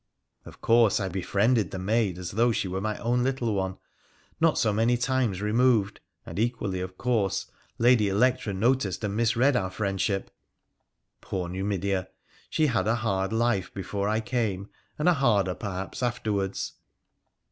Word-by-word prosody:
Of - - -13
course, 115 -3 +4
I 95 -2 -2
befriended 100 +5 +1
the - - -6
maid 100 -1 0
as 90 -1 -5
though 115 +4 +3
she 105 - -1
were 95 +1 -3
my 105 +1 -2
own 120 +1 0
little 125 -4 0
one, 95 -1 -2 0.6
not 165 -1 +3
so 110 -2 +2
many 115 +3 +2
times 120 -6 0
removed, 110 -2 +2 0.3
and 85 - -6
equally, 110 -5 -1
of 95 0 -6
course, 115 -6 0 0.3
Lady 115 -3 +4
Electra 125 +3 +2
noticed 110 0 0
and 100 -1 -2
misread 120 +4 +3
our 95 -6 0
friendship. 95 0 -2 0.9
Poor 90 -2 -3
Numidea! 95 0 -2 0.4
she 155 - +2
had 120 -7 +1
a 110 - +3
hard 95 -4 -1
life 115 -4 0
before 100 +1 -2
I 110 +1 +1
came, 110 -5 -2 0.3
and 150 - 0
a 180 - +6
harder, 105 - +2
perhaps, 95 +1 -5
afterwards. 105 -5 -1
105 Hz, 155 wpm, -27 LUFS, 95-120 Hz, 0.9 s, a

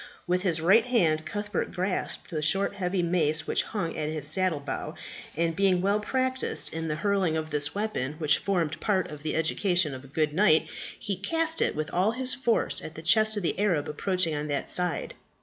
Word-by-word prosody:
With 180 0 +1
his 170 -4 +1
right 195 +8 +5
hand 160 -10 +2
Cuthbert 205 +4 -3
grasped 185 +1 -3
the 155 -2 -2
short 195 +7 +2
heavy 185 -2 -1
mace 160 -3 +1
which - - +1
hung 170 -7 -4
at 155 -1 -2
his 155 -2 -4
saddle 180 -1 +1
bow, 140 - -5 0.4
and 165 0 0
being 190 0 +3
well 200 +3 +1
practised 260 +4 -1
in 160 0 -3
the 150 - -1
hurling 185 -2 +1
of 155 0 -4
this 145 +1 -1
weapon 205 -10 -2
which 155 -2 +3
formed 170 -5 -1
part 195 -4 0
of 150 -1 -9
the 155 - -2
education 165 0 +1
of 130 0 -8
a - - -13
good 150 +2 -1
knight 160 -3 +4 0.3
he 200 -2 -3
cast 325 - 0
it - - +1
with 155 0 -3
all 190 +5 +2
his 255 +1 +1
force 245 -4 +1
at 155 - -9
the 160 - -9
chest 215 +4 +4
of 205 - -2
the 175 - -1
Arab 180 -8 +1
approaching 180 +2 0
on 150 0 -3
that 145 -1 -2
side. 180 -2 -1
180 Hz, 205 wpm, -27 LUFS, 155-200 Hz, 0.4 s, right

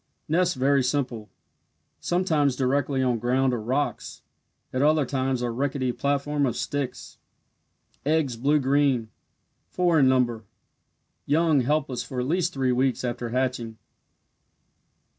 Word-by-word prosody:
Nest 175 +3 +1
very 135 +1 +2
simple 125 -5 -2 0.7
sometimes 160 -7 +1
directly 135 +1 0
on 125 -3 +1
ground 130 +2 +1
or 120 - -2
rocks 130 +6 -3 0.5
at 130 - 0
other 150 0 +3
times 130 -1 -1
a 120 - -1
rickety 130 +1 -1
platform 140 +2 0
of 120 - -2
sticks. 140 -3 -4 0.8
Eggs 150 -4 +1
blue 140 +6 +2
green 135 -4 +1 0.6
four 175 -3 +2
in 130 -2 +5
number 120 -3 +1 0.8
young 155 0 +3
helpless 135 -1 -1
for 130 - -5
at 125 - -1
least 175 +2 +1
three 135 -4 0
weeks 130 +1 0
after 120 -1 -3
hatching. 125 -2 -2
135 Hz, 125 wpm, -25 LUFS, 125-145 Hz, 0.8 s, in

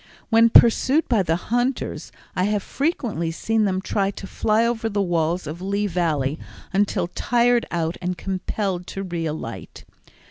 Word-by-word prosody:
When 230 +1 +6
pursued 260 +7 +5
by 230 -5 +3
the 165 -3 +1
hunters 245 +8 -2 0.2
I 185 -1 +1
have 205 -1 0
frequently 245 - -1
seen 220 +6 0
them 190 -1 0
try 195 0 0
to 200 - -7
fly 215 +3 +1
over 230 -1 -1
the 205 -1 -2
walls 175 -2 0
of 155 +4 -6
Lee 200 +2 -1
Valley 160 -6 0 0.3
until 200 -1 +1
tired 240 +3 +2
out 165 -1 -2
and 180 0 -2
compelled 190 0 -3
to 195 - -5
re 170 -3 -3
alight. 115 - -7
195 Hz, 155 wpm, -23 LUFS, 170-225 Hz, 0.3 s, When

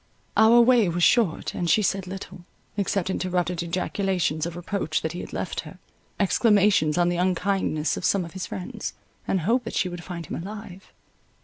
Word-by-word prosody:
Our 225 +2 +7
way 235 -5 +5
was 170 +1 -1
short, 220 -8 +3
and 175 - -2
she 215 +6 +4
said 195 -1 0
little; 185 -1 -8 0.3
except 195 -2 0
interrupted 180 -2 -1
ejaculations 175 -2 -1
of 170 - -7
reproach 175 -3 -2
that 160 - -1
he 175 - -6
had - - -7
left - - -3
her, - - -8 0.4
exclamations 200 -6 +3
on 175 0 +3
the 175 - -1
unkindness 180 -4 0
of - - -6
some 195 -3 +2
of 170 - -11
his 190 -1 -5
friends, 180 - -6 0.3
and 190 - +1
hope 235 +9 +1
that - - -5
she 185 - +1
would 175 -1 -7
find 170 -2 -6
him 165 - -5
alive. 195 -1 -9
185 Hz, 185 wpm, -25 LUFS, 175-200 Hz, 0.4 s, Our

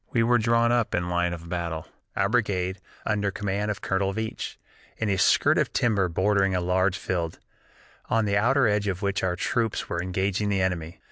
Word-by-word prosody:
"We 115 - +2
were 120 +1 +4
drawn 115 +1 +3
up 120 -2 +1
in 90 0 -1
line 90 0 +1
of 85 -1 -7
battle, 85 -2 -3 0.3
our 95 - +2
brigade, 100 -5 0 0.3
under 105 -2 0
command 100 +1 -2
of 105 - -3
Colonel 95 0 0
Veatch, 110 0 -4 0.4
in 110 - -1
a 95 - +1
skirt - - +4
of - - 0
timber 100 -6 +2
bordering 95 +2 +2
a - - +2
large 90 +1 +1
field, 85 -3 -2 0.7
on 115 -1 +2
the 100 -1 +1
outer 125 +5 +3
edge 105 -1 +1
of 95 0 -2
which 100 0 0
our 90 -1 +1
troops 115 +4 -1
were 85 - -1
engaging 95 +3 -1
the 100 -1 +1
enemy. 90 -3 -2
100 Hz, 195 wpm, -26 LUFS, 90-105 Hz, 0.7 s, were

